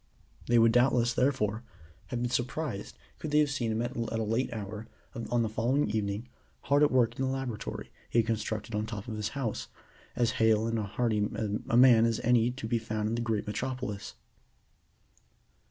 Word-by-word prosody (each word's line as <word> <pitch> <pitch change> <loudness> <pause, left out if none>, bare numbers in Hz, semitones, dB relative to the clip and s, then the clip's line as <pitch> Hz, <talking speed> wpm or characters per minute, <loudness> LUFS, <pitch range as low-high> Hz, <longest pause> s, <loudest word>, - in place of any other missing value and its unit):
They 120 - +4
would 115 0 +6
doubtless, 120 -1 +3
therefore, 120 -5 +1 0.5
have 120 -2 -3
been 120 - -1
surprised 125 -4 -3 0.2
could 155 - -4
they 150 - +2
have 150 -2 +4
seen 120 -5 -1
him 110 +2 0
at 120 +3 -4
a 115 -1 -2
late 115 +4 0
hour 110 0 -6 0.3
on 120 0 -1
the - - 0
following 115 +3 +1
evening 105 +2 -2 0.3
hard 140 +1 +2
at 150 - +6
work 120 -1 +2
in - - 0
the 130 - 0
laboratory 130 -5 -4 0.2
he - - -1
had 115 - +5
constructed 110 0 -2
at 105 - 0
the 110 - -4
top 110 -2 -6
of 110 - -4
his 105 0 -2
house, 120 -6 -2 0.5
as 120 -1 +2
hale 110 -1 +4
and 115 0 0
hearty 105 0 0 0.4
a 120 - +3
man 120 -3 +7
as 115 -1 0
any 120 -1 +3
to 125 -2 -5
be 115 0 +1
found 110 -1 -2
in - - -2
the 120 - -1
great 110 -3 -1
Metropolis. 125 -1 -4
115 Hz, 190 wpm, -30 LUFS, 110-125 Hz, 0.5 s, man